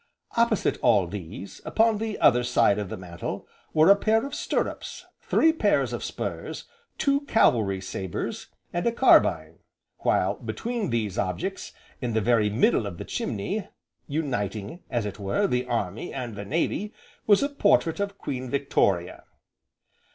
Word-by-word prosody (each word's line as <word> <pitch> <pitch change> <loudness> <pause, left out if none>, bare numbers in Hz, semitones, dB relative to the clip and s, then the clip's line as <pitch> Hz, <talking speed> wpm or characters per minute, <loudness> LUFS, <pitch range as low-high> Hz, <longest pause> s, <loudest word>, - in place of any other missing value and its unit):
Opposite 235 0 +2
all - - +4
these, - - -8
upon 225 -1 +2
the 220 -1 -3
other 125 -3 +4
side 120 -4 +3
of 100 -3 -4
the - - -5
mantel, 85 -2 -6 0.2
were 160 +4 +6
a - - +8
pair 220 +4 +2
of 280 - -7
stirrups, - - -3 0.2
three 320 0 +3
pairs 320 - +1
of - - -4
spurs, - - -5 0.3
two 280 0 +2
cavalry 110 - +3
sabres, 95 -2 -5 0.3
and 175 +5 0
a - - +3
carbine, 250 +3 +4 0.4
while - - +1
between 235 -4 -3
these 110 -5 -1
objects, 180 - -3 0.3
in 120 -3 -2
the 110 - +2
very 110 -1 +3
middle 105 0 +2
of 90 -4 -7
the - - -6
chimney, 190 - -3 0.4
uniting, 120 - -3
as 120 -3 -1
it 105 0 -6
were, 100 - 0
the 125 -8 0
Army, 110 -4 -2
and 120 -5 -5
the 100 - -6
Navy, 170 - -1 0.3
was 205 +4 +5
a 280 - +1
portrait 205 - +2
of 200 0 -2
Queen 130 -2 -5
Victoria. 100 -10 0
130 Hz, 150 wpm, -26 LUFS, -, 0.4 s, a